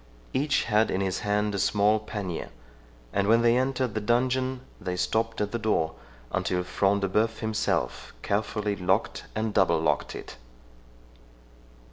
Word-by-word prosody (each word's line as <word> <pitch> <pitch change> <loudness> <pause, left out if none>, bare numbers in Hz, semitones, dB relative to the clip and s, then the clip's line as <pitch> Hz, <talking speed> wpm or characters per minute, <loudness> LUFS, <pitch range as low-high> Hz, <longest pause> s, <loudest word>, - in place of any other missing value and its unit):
Each 145 +2 +2
had 110 0 +2
in 95 - 0
his 95 -1 -1
hand 105 0 0
a 100 - -1
small 105 +2 +3
pannier; 100 -5 -5 0.6
and, 100 0 +1
when 115 +2 +5
they 120 0 +5
entered 130 -2 0
the 110 - -2
dungeon, 130 +3 +1 0.2
they 90 -1 -3
stopt 115 +5 0
at 105 0 -1
the 120 - -2
door 80 -7 +1 0.4
until 90 0 0
Front 100 +2 +1
de 100 - +1
Bœuf 110 +4 +1
himself 110 -1 -1
carefully 105 0 -1
locked 90 -2 0
and 110 -1 -1
double 85 -5 +3
locked 75 -3 0
it. - - -9
105 Hz, 150 wpm, -27 LUFS, 100-115 Hz, 0.6 s, when